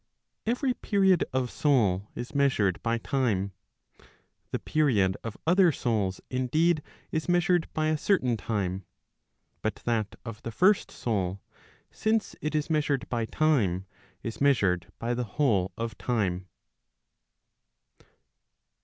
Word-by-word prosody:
Every 250 Hz, +2 st, +1 dB
period 195 Hz, -6 st, +2 dB
of 130 Hz, -1 st, -1 dB
soul 105 Hz, -, +2 dB
is 120 Hz, -, -6 dB
measured 135 Hz, -10 st, +2 dB
by 115 Hz, 0 st, 0 dB
time. 115 Hz, -6 st, 0 dB, 1.0 s
The -, -, -1 dB
period 110 Hz, -12 st, +2 dB
of 115 Hz, -3 st, -6 dB
other 180 Hz, +1 st, +5 dB
souls 105 Hz, -8 st, -1 dB
indeed 155 Hz, +6 st, +2 dB, 0.3 s
is 160 Hz, +2 st, -2 dB
measured 175 Hz, -1 st, +2 dB
by 155 Hz, 0 st, +1 dB
a 155 Hz, -1 st, 0 dB
certain 130 Hz, -, +2 dB
time; 100 Hz, -4 st, -2 dB, 0.8 s
but 110 Hz, -, -1 dB
that 110 Hz, -3 st, 0 dB
of 115 Hz, -1 st, -7 dB
the 115 Hz, -, -5 dB
first 190 Hz, -, +3 dB
soul, 100 Hz, -5 st, -2 dB, 0.5 s
since 220 Hz, 0 st, 0 dB
it 155 Hz, 0 st, -2 dB
is 150 Hz, -1 st, 0 dB
measured 145 Hz, -4 st, 0 dB
by 115 Hz, -2 st, 0 dB
time, 110 Hz, -, +1 dB, 0.4 s
is 115 Hz, +2 st, -5 dB
measured 100 Hz, -11 st, +2 dB
by 120 Hz, +1 st, -1 dB
the 125 Hz, +1 st, -1 dB
whole 100 Hz, -11 st, +2 dB
of 115 Hz, -2 st, -3 dB
time. 95 Hz, -6 st, -1 dB
125 Hz, 125 wpm, -28 LUFS, 105-155 Hz, 1.0 s, other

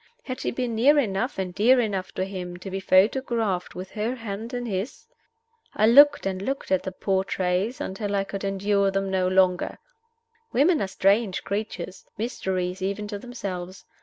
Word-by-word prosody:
Had 255 Hz, -1 st, -5 dB
she -, -, -1 dB
been 245 Hz, -1 st, -2 dB
near 265 Hz, +7 st, +5 dB
enough 230 Hz, -2 st, 0 dB
and 185 Hz, -2 st, -3 dB
dear 245 Hz, +7 st, +5 dB
enough 195 Hz, -4 st, -1 dB
to 185 Hz, -, -1 dB
him 180 Hz, -2 st, -6 dB
to 185 Hz, +2 st, -8 dB
be 195 Hz, -, -2 dB
photographed 205 Hz, 0 st, +2 dB
with 185 Hz, +1 st, -7 dB
her 220 Hz, +3 st, -2 dB
hand 225 Hz, -1 st, -6 dB
in 245 Hz, -1 st, -3 dB
his? 205 Hz, +2 st, -4 dB, 0.7 s
I 215 Hz, -, +4 dB
looked 285 Hz, +4 st, +7 dB
and 190 Hz, -1 st, -2 dB
looked 270 Hz, +3 st, -3 dB
at 190 Hz, -, +3 dB
the 190 Hz, -, -5 dB
portraits 190 Hz, +3 st, -1 dB
until 200 Hz, +1 st, -3 dB
I 195 Hz, -, +1 dB
could 195 Hz, 0 st, -6 dB
endure 200 Hz, 0 st, +1 dB
them 195 Hz, 0 st, -1 dB
no 185 Hz, -1 st, +1 dB
longer. 185 Hz, -1 st, +2 dB, 0.8 s
Women 310 Hz, +4 st, +4 dB
are 195 Hz, -, 0 dB
strange 195 Hz, +1 st, +1 dB
creatures 200 Hz, -3 st, -4 dB
mysteries 190 Hz, -5 st, -2 dB
even 200 Hz, +2 st, -2 dB
to 205 Hz, -1 st, -4 dB
themselves. 190 Hz, -6 st, -6 dB
195 Hz, 170 wpm, -25 LUFS, 190-230 Hz, 0.8 s, looked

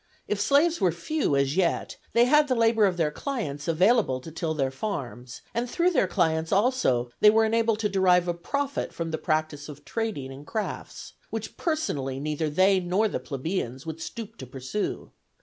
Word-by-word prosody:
If 205 Hz, -1 st, -1 dB
slaves 285 Hz, +7 st, +3 dB
were 185 Hz, -3 st, +4 dB
few 170 Hz, -, -1 dB
as 140 Hz, +1 st, +1 dB
yet, 185 Hz, -2 st, 0 dB, 0.2 s
they 235 Hz, +1 st, +5 dB
had 295 Hz, +3 st, +5 dB
the 255 Hz, -, +1 dB
labor 225 Hz, -2 st, +4 dB
of 180 Hz, -2 st, -2 dB
their 155 Hz, -3 st, +1 dB
clients 150 Hz, -, -4 dB
available 180 Hz, -, +3 dB
to 160 Hz, -, -9 dB
till 160 Hz, 0 st, -2 dB
their 135 Hz, -3 st, 0 dB
farms; 130 Hz, -, -5 dB
and 240 Hz, +1 st, -1 dB
through 345 Hz, +7 st, +2 dB
their 255 Hz, -, +2 dB
clients 160 Hz, -2 st, 0 dB
also 195 Hz, -, +2 dB
they 210 Hz, -, +8 dB
were 220 Hz, +1 st, +4 dB
enabled 225 Hz, 0 st, +2 dB
to 210 Hz, -, +2 dB
derive 180 Hz, -2 st, +3 dB
a 175 Hz, -, +1 dB
profit 280 Hz, +11 st, -3 dB
from 165 Hz, -1 st, -3 dB
the 160 Hz, -, -2 dB
practice 155 Hz, -2 st, -1 dB
of 145 Hz, 0 st, -11 dB
trading 215 Hz, -, -3 dB
and 140 Hz, +3 st, -11 dB
crafts, 220 Hz, -2 st, -5 dB, 0.2 s
which -, -, -5 dB
personally 145 Hz, -, -2 dB
neither 150 Hz, +2 st, -2 dB
they 190 Hz, +5 st, +4 dB
nor 185 Hz, +5 st, +1 dB
the -, -, -3 dB
plebeians 135 Hz, -2 st, -4 dB
would 160 Hz, 0 st, -6 dB
stoop 225 Hz, +4 st, -7 dB
to 130 Hz, -, -8 dB
pursue. 130 Hz, -, -4 dB
180 Hz, 185 wpm, -26 LUFS, 150-225 Hz, 0.2 s, they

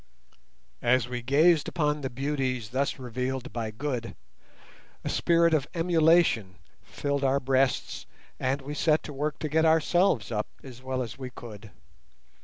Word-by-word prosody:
As 120 Hz, 0 st, +2 dB
we 125 Hz, 0 st, -4 dB
gazed 150 Hz, +5 st, +4 dB
upon 150 Hz, -3 st, 0 dB
the 130 Hz, -, -3 dB
beauties 130 Hz, -3 st, -2 dB
thus 135 Hz, +3 st, -1 dB
revealed 130 Hz, +1 st, -4 dB
by 115 Hz, -2 st, -3 dB
Good, 115 Hz, -1 st, -4 dB, 0.9 s
a -, -, -3 dB
spirit 170 Hz, -1 st, +3 dB
of 150 Hz, -2 st, +1 dB
emulation 165 Hz, -, +3 dB, 0.3 s
filled 140 Hz, -1 st, -3 dB
our 135 Hz, +1 st, +3 dB
breasts, 135 Hz, 0 st, 0 dB, 0.3 s
and 135 Hz, +2 st, -1 dB
we 145 Hz, +2 st, -5 dB
set 155 Hz, 0 st, +2 dB
to 150 Hz, -, -7 dB
work 150 Hz, +2 st, -2 dB
to 155 Hz, -, -3 dB
get 160 Hz, +2 st, +2 dB
ourselves 160 Hz, -, +3 dB
up 105 Hz, -1 st, -1 dB, 0.2 s
as 130 Hz, -2 st, -11 dB
well 130 Hz, 0 st, -2 dB
as 115 Hz, +1 st, -9 dB
we 130 Hz, -1 st, -5 dB
could. 110 Hz, -3 st, -11 dB
135 Hz, 150 wpm, -27 LUFS, 125-150 Hz, 0.9 s, gazed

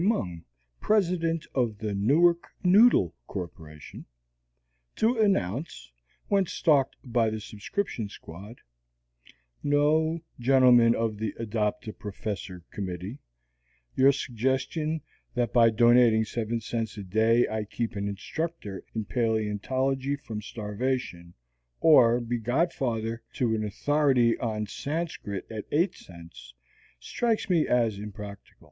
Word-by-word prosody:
Mung, 95 Hz, -, -1 dB, 0.3 s
President 170 Hz, -6 st, +1 dB
of 120 Hz, -5 st, 0 dB
the 105 Hz, -1 st, -3 dB
Newark 160 Hz, +12 st, +3 dB, 0.2 s
Noodle 190 Hz, -, +5 dB
Corporation, 80 Hz, -5 st, -8 dB, 0.9 s
to 225 Hz, +3 st, +2 dB
announce, 120 Hz, -, 0 dB, 0.4 s
when 195 Hz, -2 st, +2 dB
stalked 145 Hz, -5 st, +2 dB
by 120 Hz, -3 st, +1 dB
the 110 Hz, 0 st, -4 dB
subscription 110 Hz, -, -4 dB
squad: 100 Hz, +7 st, -11 dB, 1.0 s
"No, 155 Hz, +3 st, +2 dB, 0.2 s
gentlemen 125 Hz, -2 st, +5 dB
of 115 Hz, -2 st, -1 dB
the 110 Hz, -2 st, -3 dB
Adopt 110 Hz, +1 st, -2 dB
a 110 Hz, -, -5 dB
Professor 100 Hz, -3 st, -6 dB
Committee, 95 Hz, +5 st, -5 dB, 0.8 s
your 135 Hz, +1 st, +6 dB
suggestion 135 Hz, +5 st, -1 dB, 0.3 s
that 120 Hz, -3 st, 0 dB
by 115 Hz, -2 st, +6 dB
donating 120 Hz, -1 st, +5 dB
seven 115 Hz, +1 st, -2 dB
cents 115 Hz, -1 st, -4 dB
a 100 Hz, -, -5 dB
day 110 Hz, +5 st, +3 dB
I 110 Hz, 0 st, -2 dB
keep 115 Hz, +2 st, -4 dB
an 100 Hz, 0 st, -2 dB
instructor 105 Hz, -, -5 dB
in 110 Hz, -1 st, -2 dB
paleontology 125 Hz, +5 st, -1 dB
from 110 Hz, -6 st, -7 dB
starvation, 105 Hz, -5 st, -4 dB, 0.4 s
or 125 Hz, -7 st, +6 dB
be 120 Hz, 0 st, -3 dB
godfather 120 Hz, -3 st, -1 dB
to 120 Hz, -3 st, 0 dB
an 110 Hz, -1 st, -1 dB
authority 130 Hz, +2 st, +2 dB
on 110 Hz, -2 st, -2 dB
Sanscrit 140 Hz, -, -4 dB
at 110 Hz, -2 st, -5 dB
eight 170 Hz, +6 st, +2 dB
cents, 75 Hz, -9 st, -13 dB, 0.4 s
strikes 225 Hz, -, -1 dB
me 165 Hz, -3 st, +3 dB
as 115 Hz, -5 st, +1 dB
impractical. 105 Hz, -1 st, -9 dB
115 Hz, 115 wpm, -27 LUFS, 105-140 Hz, 1.0 s, your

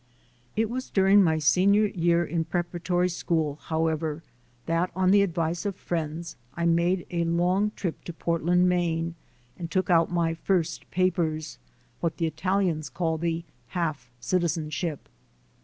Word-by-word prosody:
It 220 Hz, +1 st, +2 dB
was 255 Hz, +4 st, -4 dB
during 195 Hz, +1 st, +5 dB
my 160 Hz, -3 st, +2 dB
senior 190 Hz, +7 st, +4 dB
year 170 Hz, -3 st, +1 dB
in 165 Hz, 0 st, -1 dB
preparatory 175 Hz, +1 st, 0 dB
school, 160 Hz, -4 st, -1 dB
however, 160 Hz, -1 st, -1 dB, 0.4 s
that 165 Hz, +2 st, +1 dB
on 185 Hz, 0 st, +3 dB
the 200 Hz, 0 st, +6 dB
advice 170 Hz, -2 st, -1 dB
of 200 Hz, -2 st, -2 dB
friends 165 Hz, -1 st, -4 dB, 0.2 s
I 170 Hz, -, -1 dB
made 170 Hz, +2 st, +2 dB
a 170 Hz, -1 st, 0 dB
long 180 Hz, +5 st, +1 dB
trip 175 Hz, -5 st, -4 dB
to -, -, -5 dB
Portland, 170 Hz, +2 st, +2 dB
Maine, 170 Hz, -2 st, 0 dB, 0.5 s
and 170 Hz, -2 st, -5 dB
took 185 Hz, 0 st, 0 dB
out 165 Hz, -1 st, +4 dB
my 170 Hz, -2 st, +1 dB
first 170 Hz, 0 st, -1 dB
papers, 165 Hz, -, 0 dB, 0.4 s
what 165 Hz, -2 st, -2 dB
the 165 Hz, -, 0 dB
Italians 165 Hz, -1 st, 0 dB
call 165 Hz, -3 st, -1 dB
"the 165 Hz, 0 st, -1 dB, 0.3 s
half 155 Hz, -8 st, -2 dB
citi 175 Hz, +8 st, +1 dB
zenship." 155 Hz, -1 st, -2 dB
170 Hz, 145 wpm, -26 LUFS, 160-180 Hz, 0.5 s, the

